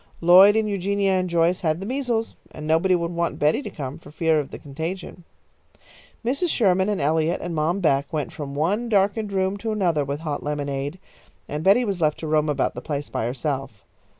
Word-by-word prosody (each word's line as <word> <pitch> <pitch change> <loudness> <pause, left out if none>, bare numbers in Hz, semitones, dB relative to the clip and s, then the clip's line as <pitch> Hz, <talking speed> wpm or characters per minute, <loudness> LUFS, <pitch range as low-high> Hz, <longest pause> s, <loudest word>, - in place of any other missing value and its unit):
Lloyd 185 +4 +7
and 220 -1 +2
Eugenia 200 0 0
and 185 -1 0
Joyce 170 +2 +2
had 160 -2 0
the 195 - -6
measles, 240 -2 -2
and 155 - -9
nobody 165 +4 +3
would 170 -1 -2
want 170 0 -2
Betty 150 - +2
to - - -6
come 140 +1 -6
for 150 - -14
fear 160 +1 +1
of 145 - -4
the - - -8
contagion. 165 +5 -6 1.0
Mrs. 280 +9 0
Sherman 190 -7 +2
and 205 - -1
Eliot 160 +3 +1
and 175 - -5
Mom 165 +5 0
Beck 140 -4 +1
went 150 -3 -3
from 140 -2 -6
one 200 +11 0
darkened 205 0 +1
room 190 0 0
to 220 +2 -3
another 175 -8 +1
with 140 +2 -4
hot 150 -3 -3
lemonade, 145 +1 -3 0.5
and 150 +1 -4
Betty 205 +7 +5
was 195 -5 -2
left 155 -1 +2
to 160 - -4
roam 155 0 +2
about 145 - 0
the - - -7
place 145 -2 -4
by 110 - -1
herself. 130 -4 -4
170 Hz, 205 wpm, -23 LUFS, 150-195 Hz, 1.0 s, Lloyd